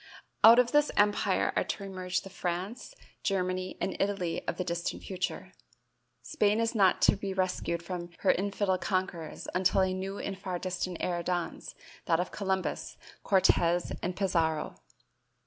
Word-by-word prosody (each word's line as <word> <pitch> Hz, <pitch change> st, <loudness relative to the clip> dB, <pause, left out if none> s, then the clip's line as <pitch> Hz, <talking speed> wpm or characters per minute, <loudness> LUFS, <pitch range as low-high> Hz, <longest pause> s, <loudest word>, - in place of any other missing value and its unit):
Out 230 Hz, +2 st, +10 dB
of 245 Hz, -1 st, +4 dB
this 295 Hz, 0 st, +4 dB
empire 205 Hz, 0 st, +2 dB
are -, -, +2 dB
to 200 Hz, -, -4 dB
emerge 185 Hz, -2 st, -2 dB
the 195 Hz, -, -11 dB
France, 190 Hz, -, -4 dB, 0.3 s
Germany 185 Hz, -1 st, -1 dB
and 190 Hz, -, -2 dB
Italy 195 Hz, -4 st, -1 dB
of -, -, -2 dB
the 185 Hz, -, -1 dB
distant 170 Hz, -1 st, -3 dB
future. 185 Hz, -1 st, -4 dB, 0.7 s
Spain 210 Hz, +1 st, +1 dB
is 230 Hz, 0 st, +1 dB
not 195 Hz, -5 st, +3 dB
to -, -, +6 dB
be 195 Hz, -1 st, -4 dB
rescued 180 Hz, -2 st, -1 dB
from 175 Hz, -1 st, -5 dB
her -, -, +5 dB
infidel 195 Hz, -1 st, 0 dB
conquerors 185 Hz, -5 st, -3 dB
until 190 Hz, +1 st, +3 dB
a 190 Hz, 0 st, +2 dB
new 190 Hz, +1 st, -4 dB
and 195 Hz, -1 st, -5 dB
far 185 Hz, -2 st, -3 dB
distant 180 Hz, -1 st, -3 dB
era 175 Hz, -1 st, -1 dB
dawns, 175 Hz, 0 st, -3 dB, 0.3 s
that 165 Hz, -1 st, +2 dB
of 180 Hz, -, -2 dB
Columbus, 190 Hz, -2 st, -2 dB, 0.2 s
Cortez 175 Hz, -3 st, +3 dB
and 180 Hz, +1 st, -2 dB
Pizarro. 165 Hz, -5 st, 0 dB
185 Hz, 155 wpm, -30 LUFS, 180-195 Hz, 0.7 s, Out